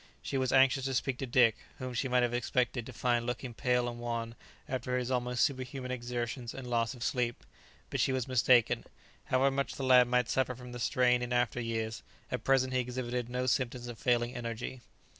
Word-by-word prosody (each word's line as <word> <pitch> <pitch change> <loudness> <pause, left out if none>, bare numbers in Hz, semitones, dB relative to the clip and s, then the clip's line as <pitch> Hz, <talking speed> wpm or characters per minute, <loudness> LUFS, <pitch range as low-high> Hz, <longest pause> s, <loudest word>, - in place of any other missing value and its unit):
She 135 - -1
was 130 -1 0
anxious 135 0 +4
to 135 -1 -1
speak 130 0 -1
to 135 - -3
Dick, 120 -2 +4 0.2
whom 130 -1 -5
she 125 +3 -1
might 125 -1 +3
have 120 0 0
expected 120 -1 0
to - - -7
find 120 0 +1
looking 120 0 -4
pale 125 +1 +1
and 120 0 -5
wan 115 -1 -3 0.3
after 125 -1 -2
his 125 0 -2
almost 125 -1 +1
superhuman 130 -1 -2
exertions 120 -1 -4
and 135 -2 -7
loss 120 +1 0
of 120 - -7
sleep. 120 -2 -1 0.5
But - - -2
she - - +3
was 130 -2 -1
mistaken; 125 -2 +3 0.4
however 135 +2 +3
much 140 0 -2
the 135 - -5
lad 125 -1 +6
might 125 0 +2
suffer 130 -1 0
from 125 0 -10
the 120 - -7
strain 125 0 +3
in 125 0 -3
after 120 0 +1
years, 115 -1 -3 0.3
at - - -3
present 130 -1 +2
he 130 - +2
exhibited 125 -1 -3
no 125 +1 -1
symptoms 125 -1 0
of 120 -2 -8
failing 120 -1 +1
energy. 120 +1 -5
125 Hz, 205 wpm, -31 LUFS, 120-130 Hz, 0.5 s, lad